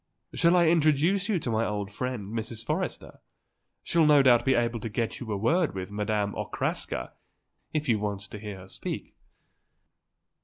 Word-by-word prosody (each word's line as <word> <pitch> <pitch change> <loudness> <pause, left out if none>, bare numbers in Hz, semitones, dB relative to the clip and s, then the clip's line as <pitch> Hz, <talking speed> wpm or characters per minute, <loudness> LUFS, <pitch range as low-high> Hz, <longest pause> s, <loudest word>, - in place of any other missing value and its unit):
"Shall 170 +1 +4
I 175 - +5
introduce 165 +5 +3
you 205 - +2
to 135 -7 -2
my 110 0 +1
old 105 -2 -3
friend, 115 -3 -4
Mrs. 115 0 -4
Forrester? - - -3 0.6
She'll 165 -2 +3
no 145 -2 +6
doubt 120 -2 +5
be 130 - +4
able 120 0 0
to 115 - -5
get 115 +1 -2
you 120 -4 -6
a 100 - 0
word 155 - +1
with 95 +1 -5
Madame 105 0 -1
Okraska, - - -3 0.6
if 155 -1 -2
you 115 -4 +2
want 100 -1 -2
to 105 +1 -9
hear 105 -2 -7
her 95 - -12
speak." - - -6
115 Hz, 170 wpm, -28 LUFS, 105-150 Hz, 0.6 s, no